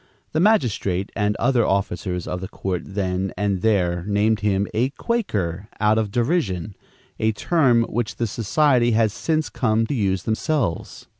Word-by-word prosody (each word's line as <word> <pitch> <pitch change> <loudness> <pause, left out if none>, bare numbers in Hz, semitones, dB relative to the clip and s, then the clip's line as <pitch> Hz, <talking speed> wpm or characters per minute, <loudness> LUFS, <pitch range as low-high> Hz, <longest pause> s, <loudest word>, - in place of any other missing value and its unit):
The 155 - 0
magistrate 115 - +1
and 105 -1 0
other 120 0 +2
officers 95 -3 -1
of 90 0 -4
the 95 - -4
court 90 -2 -3
then 95 -1 -2
and 100 -2 0
there 90 -5 +1
named 105 +2 +2
him 100 -1 +1
a 120 +4 +1
"Quaker" 105 - -2
out 105 +1 +3
of 110 -2 -1
derision, 110 - -1 0.4
a 110 0 +1
term 125 -2 +3
which 115 -1 -3
the 120 - -1
society 120 +3 +2
have 110 -1 +3
since 155 +7 -1
come 115 -3 +1
to 130 - -3
use 95 -7 0
themselves. 110 - -2
105 Hz, 155 wpm, -22 LUFS, 95-120 Hz, 0.4 s, out